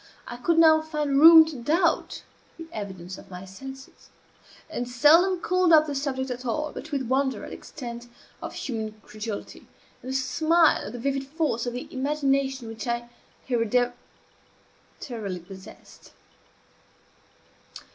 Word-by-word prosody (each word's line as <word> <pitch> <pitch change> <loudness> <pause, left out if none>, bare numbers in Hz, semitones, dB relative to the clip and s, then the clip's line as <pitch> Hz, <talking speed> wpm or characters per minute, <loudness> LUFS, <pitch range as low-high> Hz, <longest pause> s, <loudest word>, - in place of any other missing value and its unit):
I 240 - -7
could 325 +7 +1
now 315 -1 +6
find 300 -3 -1
room 325 0 +10
to 315 -2 -7
doubt 320 +8 0 0.3
the 330 - -8
evidence 190 -3 -7
of - - -15
my 180 0 -9
senses; 265 +8 -11 0.6
and 245 -6 -4
seldom 330 +9 +5
called 365 -1 +2
up 310 -1 +7
the 295 - -4
subject 265 -2 -2
at 250 +1 -5
all 300 +5 -2
but 315 - -8
with 280 -2 -1
wonder 265 +2 0
at - - -8
the - - -6
extent 240 -4 -8 0.3
of - - -7
human 220 -4 -5
credulity, 215 -1 -7 0.3
and 255 - -8
a 265 - -3
smile 315 +5 +2
at - - -8
the - - -6
vivid 275 +2 -2
force 285 -6 -1
of 240 - -3
the 245 - -6
imagination 270 -2 0
which 225 +1 -7
I 235 0 -3 0.4
hereditarily 240 -3 -4
possessed. 190 +2 -14
265 Hz, 145 wpm, -26 LUFS, 235-305 Hz, 0.6 s, room